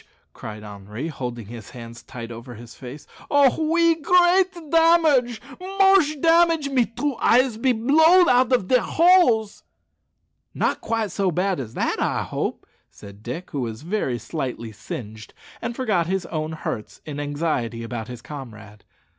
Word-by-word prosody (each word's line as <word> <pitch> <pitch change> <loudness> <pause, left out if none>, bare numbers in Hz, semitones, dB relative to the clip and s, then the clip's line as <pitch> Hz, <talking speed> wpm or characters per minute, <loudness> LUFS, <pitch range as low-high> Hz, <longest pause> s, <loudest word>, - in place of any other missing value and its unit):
cried 105 0 -9
Henri, 105 +8 -7
holding 125 -6 -6
his 115 0 -10
hands 115 -1 -10
tight 120 -2 -9
over 120 +1 -9
his 115 0 -12
face. 130 +5 -10 0.2
"Oh! 285 +2 +3
oui, 335 0 +4
great 360 +3 +4 0.2
damage 320 -8 +4 0.2
moche 385 -5 +3
damage; 330 -2 +3
me 255 -4 +2
two 280 +4 -3
eyes 245 0 +3
be 255 +3 +2
blowed 320 +10 +5
out 250 0 +3
of 245 -8 +2
dere 250 +1 +3
holes." 325 - +3 0.9
"Not - - -1
quite 225 -3 -2
so 195 -2 0
bad 180 +1 -1
as 115 -4 -7
that, - - -1
I - - 0
hope," - - -4 0.2
said 100 0 -14
Dick, 140 +11 -7
who 145 - -3
was 115 +1 -5
very 170 - -2
slightly 120 -3 -5
singed, 110 0 -9 0.3
and 235 - -4
forgot 205 -10 0
his 190 -1 -2
own 155 -1 -4
hurts 115 -8 -6
in 145 -2 -6
anxiety 145 -6 -2
about 115 -1 -6
his 125 -2 -9
comrade. 110 -7 -10
180 Hz, 155 wpm, -23 LUFS, -, 0.9 s, blowed